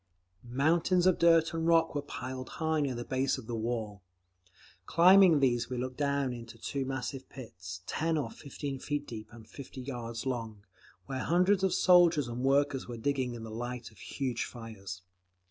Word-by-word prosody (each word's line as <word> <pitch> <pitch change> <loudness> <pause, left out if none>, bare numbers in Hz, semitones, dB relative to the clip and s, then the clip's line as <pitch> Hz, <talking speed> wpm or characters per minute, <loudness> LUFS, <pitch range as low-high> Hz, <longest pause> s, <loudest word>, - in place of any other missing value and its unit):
Mountains 160 +8 +2
of 185 -2 +4
dirt 165 -1 +5
and 165 0 -1
rock 165 -1 +4
were 145 - -1
piled 130 -2 -6
high 160 -1 +1
near 135 -3 -1
the 120 0 -5
base 130 +1 0
of 130 - -9
the 120 - -5
wall. 110 -3 -3 0.9
Climbing 180 -1 +7
these 120 -3 +1
we 125 - -3
looked 125 +1 -4
down 140 -3 0
into 115 -1 -9
two 135 +4 -3
massive 135 0 -4
pits, 90 -8 -9
ten 160 +1 0
or 145 - -2
fifteen 140 -1 -6
feet 145 +2 -3
deep 110 -4 -8
and 115 -2 -13
fifty 135 -1 -9
yards 120 -3 -5
long, 115 -5 -4 0.4
where 135 -1 -4
hundreds 180 +7 +2
of 190 - +3
soldiers 175 -6 +5
and 120 +1 -5
workers 135 0 +2
were 120 -1 -6
digging 130 0 -1
in 115 - -8
the 110 - -7
light 120 +1 -5
of 110 - -20
huge 130 -4 -3
fires. 100 -6 -8
130 Hz, 180 wpm, -31 LUFS, 120-150 Hz, 0.9 s, Climbing